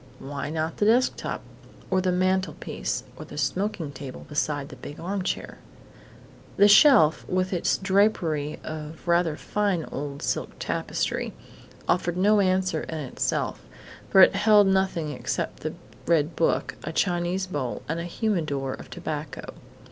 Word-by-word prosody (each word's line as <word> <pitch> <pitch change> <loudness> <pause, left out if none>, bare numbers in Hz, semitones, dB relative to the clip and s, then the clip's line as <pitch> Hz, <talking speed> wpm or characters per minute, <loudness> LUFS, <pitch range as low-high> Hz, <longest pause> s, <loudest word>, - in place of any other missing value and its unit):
Why 140 +1 -5
not 160 +1 -2
the 205 - +2
desk 245 +3 +4
top, - - -5 0.5
or 190 0 +3
the 185 0 +1
mantelpiece, 185 - -1
or - - -7
the - - -10
smoking 175 +1 -1
table 135 -1 -8
beside 145 -1 -1
the - - -9
big 145 - -9
armchair? 190 +2 -3 1.0
The 200 - +7
shelf, 205 - +7
with 185 +1 0
its 175 - +1
drapery 190 -7 +1
of 155 +1 -7
rather 170 -2 +3
fine 200 -6 -1
old 140 0 -5
silk - - -2
tapestry, - - -2 0.5
offered 175 0 +1
no 205 +3 +4
answer 185 -4 +1
in 160 - -5
itself, 140 -5 -2 0.5
for 190 - +7
it 185 - +8
held 205 0 +5
nothing 190 -5 +1
except - - -3
the - - -4 0.3
red 160 -1 +2
book, 165 - 0
a 160 - -4
Chinese 175 +2 0
bowl, 145 -9 -4
and 165 +2 -2
a 170 - -4
humidor 155 -9 -1
of - - -10
tobacco. - - -6
175 Hz, 145 wpm, -26 LUFS, 150-190 Hz, 1.0 s, it